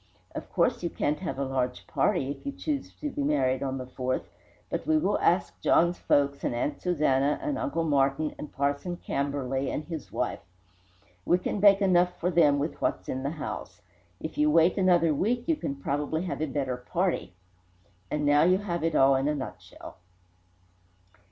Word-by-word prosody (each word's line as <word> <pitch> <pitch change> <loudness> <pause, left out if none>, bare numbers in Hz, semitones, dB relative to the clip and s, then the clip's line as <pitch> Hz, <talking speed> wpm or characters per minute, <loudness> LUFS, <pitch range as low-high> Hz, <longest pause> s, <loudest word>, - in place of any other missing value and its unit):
Of - - -7
course - - +1
you 170 - -1
can't 150 -2 -1
have 135 -8 -4
a 140 - -1
large 125 -1 -2
party, 135 +1 0
if - - -8
you 280 - -3
choose 290 0 -3
to 295 -1 -2
be - - -3
married 135 -3 +1
on 135 -1 -2
the 130 - -5
4th, 130 0 -2 0.4
but - - -4
we 315 0 +4
will 310 - +1
ask - - +1
John's 175 +1 +3
folks 140 -1 +1
and - - -1
Aunt 145 +5 -2
Susanna 145 -5 +2
and 295 -2 -2
Uncle 285 - -1
Martin 145 0 +1
and 150 - -7
Parson 140 +5 -1
Camberley 140 -2 -2
and 155 - -3
his 160 -5 -7
wife. - - -2 0.8
We 175 - +3
can 185 +3 -3
bake 200 0 +6
enough 180 -1 +3
for 180 +2 0
them 150 -4 +4
with 145 +3 -3
what's - - -1
in 130 - -2
the 140 - -1
house. 155 0 -6 0.4
If 160 - -6
you 150 0 +4
wait 165 +3 +4
another 175 -4 +3
week, 235 - 0
you 330 - +2
can 215 - -4
probably 145 +4 -2
have 180 -4 -4
a 155 - 0
better 135 -3 -2
party 170 - -2 0.7
and 150 -1 -1
now 145 0 +5
you 180 +3 +5
have 175 -5 -3
it 165 -1 0
all 135 0 +5
in 135 +2 +1
a 150 - +1
nutshell." 135 -3 -8
150 Hz, 190 wpm, -28 LUFS, 140-180 Hz, 0.8 s, bake